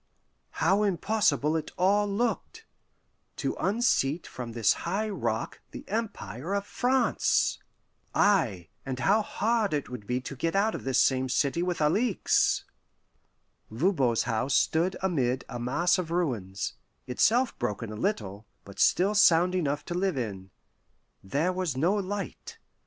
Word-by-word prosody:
How 195 +5 +4
impossible 190 -6 +1
it 155 -1 -2
all 205 +3 +3
looked 230 +4 -2 0.7
to - - -2
unseat 185 - +1
from 120 -2 -7
this 115 -2 +3
high 200 +6 -1
rock 200 - -3
the - - -9
Empire 200 - -4
of 200 0 -2
France! 255 +3 +1 0.6
Ay, 115 - +2
and 130 -2 -4
how 205 - +3
hard 220 -4 0
it 145 - -3
would 120 -5 -8
be 125 +1 0
to 135 +2 -7
get 165 +7 -2
out 210 +3 +2
of - - -6
this 135 -1 +2
same 130 -1 +2
city 140 +6 +1
with 180 0 -1
Alixe! 195 +9 +2 1.0
Voban's 130 - +1
house 115 +3 0
stood 170 +4 +2
amid 130 -8 0
a 120 - -6
mass 170 +10 +1
of 175 -3 -3
ruins, 120 - -2 0.3
itself 235 - +2
broken 105 +1 -3
a - - -6
little, 105 - -3 0.2
but 100 0 -12
still 195 +4 +3
sound 180 -3 +5
enough 145 -5 -1
to - - -4
live 180 -3 0
in. 100 -6 -4 0.7
There 150 - 0
was 180 -8 -2
no 170 +8 +2
light. 205 - -4
165 Hz, 140 wpm, -28 LUFS, 125-200 Hz, 1.0 s, sound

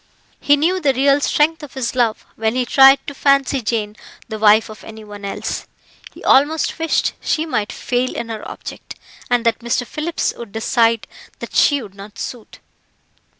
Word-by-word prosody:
He 290 0 +3
knew 355 +5 +1
the 275 -4 +2
real 275 +2 +3
strength 320 +3 +1
of 295 -2 -11
his 255 -3 -2
love, 240 -3 0
when 220 +1 -1
he 255 -1 0
tried 270 +2 +6
to 285 - -6
fancy 275 -1 +2
Jane 215 -2 -2 0.3
the 220 -1 -5
wife 215 +1 +5
of 215 -1 -12
any 220 0 -10
one 205 -1 -11
else. 200 - -4 0.4
He - - -14
almost 305 +5 +3
wished 325 -1 0
she 315 0 0
might 215 -10 -2
fail 250 +1 -2
in 235 - -5
her 220 -2 -5
object, - - -9 0.3
and 245 -1 +1
that 230 -1 +2
Mr. 240 +1 -1
Phillips 310 +7 -2
would 230 -4 -10
decide 230 0 +1 0.3
that - - -9
she 285 -3 +3
would 200 -3 -12
not 205 +2 -12
suit. 235 -1 -7
245 Hz, 180 wpm, -19 LUFS, 220-280 Hz, 0.4 s, tried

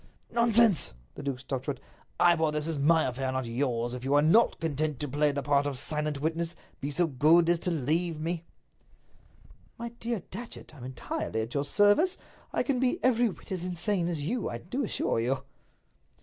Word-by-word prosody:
"Nonsense!" 230 - +3 0.2
The - - -8
duke 140 -3 -3
stopped 130 -1 -4
short. 145 - -2 0.4
"Ivor, 165 -2 +4
this 150 0 -2
is 160 -3 -2
my 160 +3 +4
affair, 130 +1 -2
not 130 -1 -2
yours. 120 0 -1
If 125 0 -6
you 135 +2 +2
are 145 - +6
not 220 +10 +4
content 155 -3 -1
to 145 - -2
play 145 +2 +2
the 140 0 -3
part 145 0 +2
of 140 -2 -3
silent 150 +1 -1
witness, 165 +3 -1 0.2
be 140 - -3
so 155 +5 +2
good 160 +4 +4
as 175 -1 +3
to 180 - -2
leave 165 +2 0
me." 165 +1 -2 1.3
"My 235 0 -5
dear 235 -2 -4
Datchet, 230 -4 -8
I'm 130 -5 -10
entirely 125 -3 -3
at 115 +2 -5
your 140 0 0
service. 210 - +3 0.3
I - - +1
can 270 -4 0
be 255 -1 +2
every 245 -2 +4
whit 190 - -11
as 185 -2 -2
insane 180 0 0
as 165 -4 -2
you, 235 +5 -1
I 120 - -4
do 245 - -3
assure 205 - 0
you." 125 +4 0
155 Hz, 190 wpm, -29 LUFS, 140-180 Hz, 1.3 s, are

